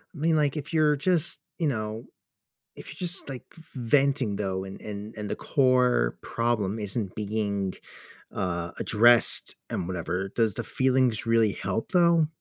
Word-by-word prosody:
I - - -10
mean, 160 +1 +2
like, 150 0 +1
if 150 +3 -6
you're 155 -2 +4
just, 165 +2 +1 0.2
you 165 -4 0
know, 110 -3 -3 0.7
if - - -11
you're 175 +4 -4
just, 175 +3 -3
like, 135 -3 -7
v 165 - -15
venting, 130 -2 +1
though, 95 -2 -2
and 95 0 -9
and 105 +1 -7
and 105 -1 -5
the - - -2
core 125 - +2
problem 115 -3 -1
isn't 105 -1 -3
being, 100 -2 -2 0.6
uh, 85 -2 -2
addressed 120 +2 +4
and 85 - -3
whatever, 90 +1 -3
does 110 -1 +1
the - - -3
feelings 130 -4 +1
really 115 -3 +3
help 100 +4 -3
though? 170 -3 +4
115 Hz, 160 wpm, -26 LUFS, 100-140 Hz, 0.7 s, you're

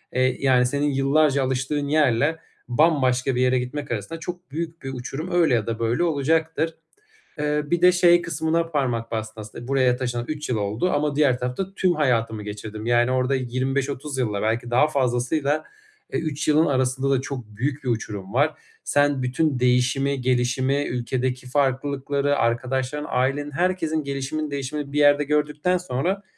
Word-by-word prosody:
İii, 130 0 +2
yani, 125 -1 +4
senin 145 +3 0
yıllarca 140 +1 +2
alıştığın 135 +3 -1
yerle 150 +1 +2 0.3
bambaşka 130 -2 +2
bir 125 - +1
yere 130 0 +3
gitmek 140 +2 -5
arasında 120 +9 -4
çok 180 -3 -7
büyük 165 +1 -5
bir 135 0 -5
uçurum 135 +8 -5
öyle 170 -6 +3
ya 115 -2 +1
da 115 0 -3
böyle 115 +8 +1
olacaktır. 160 +1 0 0.6
Eee, 150 0 +1
bir 175 +3 0
de 180 0 +7
şey 175 -1 +5
kısmına 165 0 0
parmak 125 -7 -1
bastın 110 -1 -4
s - - -8
aslında 120 +3 -10
buraya 130 -2 +3
taşınalı 120 -1 -3
3 150 0 -4
yıl 120 - 0
oldu 105 - -1
ama 145 0 0
diğer 140 -4 +3
tarafta 130 +11 -3
tüm 185 -2 +2
hayatımı 115 -7 0
geçirdim. 105 +1 -7
Yani, 120 +1 +3
orada 130 +1 +1
25-30 130 +2 -2
yılla 105 -5 -1
belki 115 +2 -1
daha 130 +5 +4
fazlasıyla, 140 +2 0 0.5
eee, - - +1
3 155 -2 -3
yılın 155 +2 +4
arasında 130 0 0
da 135 -2 +2
çok 130 -3 -6
büyük 130 +7 -4
bir 130 - -2
uçurum 105 -4 -4
var. 145 +5 +2 0.3
Sen 145 -1 +2
bütün 130 +1 0
değişimi, 125 +2 +2
gelişimi, 130 +3 +1
ülkedeki 125 +1 -2
farklılıkları, 140 +1 0
arkadaşların, 130 +5 -1
ailenin 135 +3 0
herkesin 165 -2 0
gelişiminin 140 +2 -3
değişimini 140 +1 -4
bir 150 - 0
yerde 145 0 +5
gördükten 150 +4 +1
sonra 180 +5 -2
135 Hz, 165 wpm, -23 LUFS, 125-150 Hz, 0.6 s, de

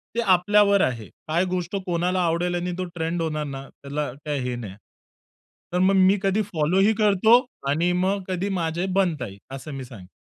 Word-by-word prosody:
ते - - 0
आपल्यावर 200 +2 +4
आहे. 115 -4 -1 0.2
काय 170 +4 +1
गोष्ट 180 0 -3
कोणाला 180 +1 0
आवडेल 175 +2 0
आणि 175 +1 -2
तो 185 - -2
ट्रेंड 165 +1 -2
होणार 155 -2 -2
ना, 135 -1 -7
त्याला 140 -1 -5
काय 145 -2 -1
हे 125 - -2
नाही. 105 -6 -7 1.0
तर 180 - +1
मग 190 +1 +4
मी 190 +2 +5
कधी 195 +2 +2
फॉलो 175 -1 0
ही 210 +3 +4
करतो 215 +3 +5 0.3
आणि 170 +5 +2
मग 195 0 0
कधी 190 +2 -2
माझे 165 +2 -1
बनता 160 -9 0
ही 100 -3 -10 0.2
असं 145 +3 -8
मी 135 -1 -5
सांग 100 -7 -12
175 Hz, 190 wpm, -24 LUFS, 150-190 Hz, 1.0 s, मी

